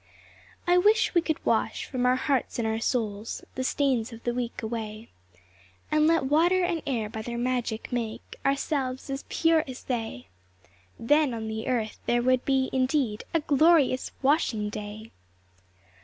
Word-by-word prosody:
I 355 +1 +5
wish 425 +4 +3
we 345 - +4
could 315 -2 -3
wash - - +1
from 250 -2 -1
our 250 - +4
hearts 265 0 0
and 230 -2 0
our 220 0 -1
souls 220 -3 -2
The 260 - -3
stains 255 -4 +1
of 230 0 -11
the 240 - -1
week 240 -1 -4
away, 220 0 -5 0.8
And 305 0 +4
let 330 -2 +3
water 340 +6 +3
and 350 -2 0
air 235 -6 -1
by 220 +1 -6
their 235 +2 -5
magic 245 -1 -2
make 230 -3 -4
Ourselves 275 -1 -1
as 270 +1 -4
pure 325 -1 +3
as 260 -1 -8
they; 225 - -4 0.7
Then 290 +1 +2
on 220 -1 -4
the 220 +2 -4
earth 230 -4 -1
there 240 0 +2
would 255 0 +2
be 265 -1 +1
indeed 255 -4 0
A 330 - +3
glorious 295 -2 +3
washing 260 -7 +2
day! 215 +1 -7
255 Hz, 160 wpm, -27 LUFS, 225-290 Hz, 0.8 s, I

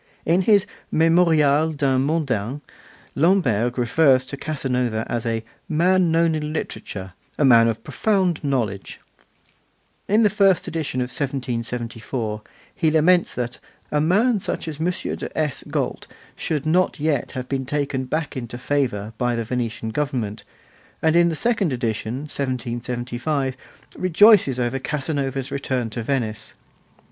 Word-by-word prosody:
In 175 +3 +3
his 205 +1 +4 0.2
'Memorial 160 -2 +3
d'un 135 -3 +1
Mondain' 140 -4 -1 0.5
Lamberg 130 - +2
refers 130 +1 +3
to 140 - -6
Casanova 125 -6 -2
as 120 -1 -2
'a 115 -1 -1 0.3
man 180 +3 +3
known 165 0 +3
in 150 -1 -2
literature, 95 - -5 0.2
a 145 - +3
man 115 -3 +7
of 115 -1 -2
profound 180 - 0
knowledge.' 115 -9 -2 1.1
In 215 +3 +4
the 210 - +4
first 195 -3 +3
edition 155 -6 -2
of 125 - -2
1774, 120 -4 -3 0.3
he 160 - +1
laments 170 +3 +3
that 125 0 -3 0.3
'a 150 - +2
man 205 +8 +3
such 180 - -4
as 155 -1 -5
M. 165 - +1
de 180 - -5
S. 150 -4 0
Galt' 145 -4 -2 0.3
should 150 -2 -2
not 175 +2 +2
yet 145 -4 -1
have 130 -2 -5
been 135 -1 -3
taken 140 -2 -1
back 155 +3 -3
into 120 -2 -5
favour 120 -6 -1
by 120 -1 +1
the 115 - -1
Venetian 115 -1 -3
government, 120 -5 -2 0.6
and 160 0 +3
in 170 0 +5
the 165 - -2
second 215 -3 +1
edition, 120 0 -2
1775, 125 0 -3 0.4
rejoices 185 - +5
over 125 +2 -1
Casanova's 135 -1 -3
return 130 -4 -2
to 120 - -4
Venice. 110 -3 -3
140 Hz, 135 wpm, -22 LUFS, 120-160 Hz, 1.1 s, man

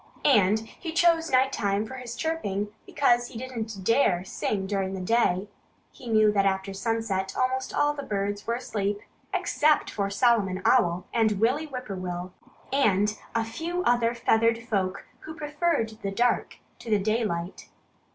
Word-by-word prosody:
And 215 -5 +4
he 320 - -8
chose 335 -1 +3
night 265 +1 +3
time 200 +1 0
for 260 - -9
his 250 -2 -7
chirping 210 -12 -2 0.2
because 240 -3 +2
he 230 - -9
didn't 225 -5 -5
dare 185 -5 +2
sing 195 0 -2
during 195 -1 -2
the - - -5
day. 195 -1 +1 0.4
He 250 - -13
knew 215 -1 +5
that 200 -1 +2
after 195 0 0
sunset 200 -2 -2
almost 260 +1 0
all 295 0 +2
the 290 - -5
birds 205 -4 -3
were 230 - +1
asleep 205 -4 -2 0.3
except 300 0 +2
for 200 -1 -1
Solomon 200 -4 +2
Owl 180 -8 +3
and 225 -2 +3
Willie 260 +8 +1
Whip 255 -3 -6
poor 195 -2 -5
will 180 0 -5 0.4
and 210 -6 +2 0.2
a 230 -1 +1
few 335 +10 -3
other 240 -3 +2
feathered 230 0 +2
folk 195 -4 -2
who 315 - -9
preferred 300 -5 0
the 200 - -2
dark 240 +5 0 0.2
to 235 - -9
the 215 - +4
daylight. 200 -4 -2
225 Hz, 160 wpm, -26 LUFS, 195-255 Hz, 0.4 s, knew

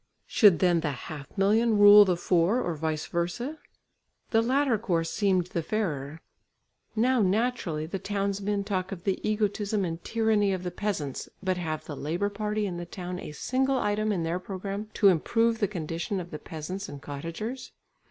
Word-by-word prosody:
Should 205 -7 +5
then 175 +1 +3
the 155 -2 -1
half 145 +1 -7
million 215 +3 +3
rule 205 0 +9
the 180 -3 +1
four 175 +6 +2
or 175 -8 -1
vice 155 0 -2
versa? 235 - -3 0.7
The 225 - +4
latter 255 -1 +2
course 170 -6 0
seemed 190 -4 +2
the 170 -1 -3
fairer. 160 -6 -3 0.7
Now 245 +2 +3
naturally 195 -6 0
the 180 +4 -4
townsmen 200 0 -1
talk 190 -2 -2
of 180 -3 -6
the 195 - 0
egotism 210 -1 0
and 165 0 -5
tyranny 220 -3 +2
of 185 -1 -3
the 180 - -3
peasants, 175 -8 -3
but 185 -1 0
have 160 -3 -3
the 150 - -6
labour 170 +9 -1
party 210 +1 -2
in 180 -3 -3
the 175 - -5
town 180 0 -6
a - - -7
single 265 - 0
item 215 -1 0
in 180 -5 -1
their 165 +2 -1
programme 200 +2 -5
to 200 - +6
improve 225 +6 +2
the 205 - +2
condition 170 +1 -3
of 175 -1 -7
the 150 - -6
peasants 180 +5 -6
and 145 -1 -9
cottagers? 165 - -6
195 Hz, 175 wpm, -28 LUFS, 170-215 Hz, 0.7 s, rule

